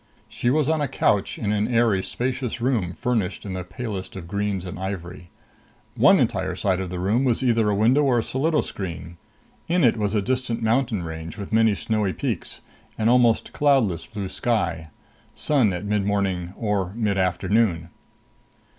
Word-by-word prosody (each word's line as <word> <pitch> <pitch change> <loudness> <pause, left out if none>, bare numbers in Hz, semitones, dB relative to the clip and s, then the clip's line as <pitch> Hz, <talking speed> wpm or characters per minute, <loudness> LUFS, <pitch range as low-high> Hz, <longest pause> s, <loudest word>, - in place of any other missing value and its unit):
She 120 - -1
was 145 +1 +2
on 160 -1 +1
a 145 - +1
couch 105 -6 +1
in 105 -2 -1
an 105 0 +1
airy, 115 -5 +2
spacious 125 +2 -3
room 115 -8 0
furnished 105 -5 -2
in 95 - -4
the 90 -1 -4
palest 100 0 -6
of 90 -3 -7
greens 100 -1 -2
and 90 0 -7
ivory. 90 -2 -6 0.7
One - - +6
entire - - 0
side 95 -1 0
of 95 -1 -4
the 90 - -5
room 100 +8 +1
was 125 -1 +1
either 115 -4 +3
a 105 - +1
window 120 +8 +4
or 135 -4 +3
a 115 - +1
solido 150 +6 +1
screen. 85 -3 -6 0.5
In 175 0 +2
it 120 -2 +4
was 105 0 -1
a 105 - +2
distant 125 -1 -1
mountain 115 -4 +1
range 80 +2 -7
with 100 +1 -7
many 110 -2 +4
snowy 105 -2 -1
peaks, - - -4 0.4
an 110 +1 +2
almost 120 -2 +3
cloudless 110 - +2
blue 100 -3 -5
sky. 95 -6 -1 0.5
Sun 135 -9 +2
at 90 +2 -4
midmorning 100 -3 -1
or 100 -4 -1
midafternoon. 95 -3 +1
105 Hz, 170 wpm, -24 LUFS, 95-120 Hz, 0.7 s, One